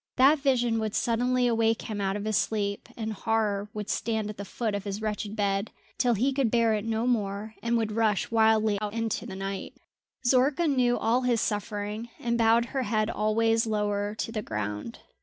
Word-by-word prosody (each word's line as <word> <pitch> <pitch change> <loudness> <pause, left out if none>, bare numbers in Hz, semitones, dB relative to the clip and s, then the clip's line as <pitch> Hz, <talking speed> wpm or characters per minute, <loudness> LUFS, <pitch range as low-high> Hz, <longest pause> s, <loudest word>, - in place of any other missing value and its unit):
That 275 +4 +5
vision 245 -5 +2
would 215 -1 -2
suddenly 245 +2 +1
awake 225 -1 +2
him 210 -2 -4
out 195 0 0
of 205 0 -4
his 215 -1 0
sleep, 200 +2 -1
and 220 -1 -3
horror 210 -2 0
would 210 -1 -5
stand 220 -2 -1
at 210 - -13
the 200 - -5
foot 220 +2 -3
of 200 -1 -2
his 200 0 -4
wretched 215 -1 -3
bed, 200 0 0 0.3
till 245 -2 +3
he 260 +6 +1
could 265 -3 +1
bear 230 -1 +3
it 210 0 -2
no 225 +1 -1
more 215 -3 -1
and 235 0 +1
would 220 -2 -1
rush 215 -2 +1
wildly 220 -2 +3
out 210 -1 -3
into 225 -1 -2
the 190 - -7
night. 195 0 -5 0.5
Zorka 270 +6 +3
knew 250 -4 +2
all 235 +3 +2
his 245 -2 +2
suffering, 210 +1 -3
and 235 -1 -1
bowed 230 0 +4
her 270 - 0
head 215 -1 0
always 225 +1 +2
lower 205 -1 -1
to 225 - -3
the 220 -2 -2
ground. 105 - -4
220 Hz, 195 wpm, -27 LUFS, 205-235 Hz, 0.5 s, That